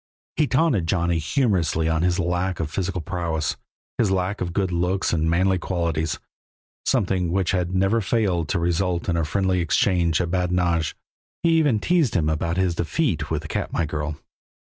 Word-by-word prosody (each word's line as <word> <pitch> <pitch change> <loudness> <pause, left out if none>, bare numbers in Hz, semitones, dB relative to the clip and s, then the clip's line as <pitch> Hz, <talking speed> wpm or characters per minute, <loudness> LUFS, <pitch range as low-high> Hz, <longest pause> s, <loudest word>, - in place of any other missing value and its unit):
He 150 - +2
taunted 130 - +2
Johnny 85 -1 +1
humorously 80 - +1
on 80 -1 +1
his 90 0 +2
lack 90 0 -1
of 75 -2 -3
physical 90 +1 -2
prowess, 85 -3 -2 0.4
his 110 - +3
lack 95 +2 -1
of 85 - -2
good 95 0 0
looks 90 +2 0
and 80 -1 +1
manly 95 +2 +2
qualities 85 -3 -1 0.7
something 90 -3 +1
which 95 0 +1
had 90 -2 -1
never 95 +5 +2
failed 95 -7 0
to - - +1
result 85 +1 0
in 85 - +1
a 85 - +1
friendly 95 +3 0
exchange 85 0 +2
of 85 -2 -1
badinage; 90 -3 0 0.5
he 170 - +4
even 155 -8 +3
teased 165 -3 +2
him 80 -4 +2
about 85 +2 -1
his 95 -2 +2
defeat 85 -2 -1
with - - -2
the - - -7
Katmai 85 - -2
girl. 75 0 -3
90 Hz, 170 wpm, -23 LUFS, 85-95 Hz, 0.7 s, he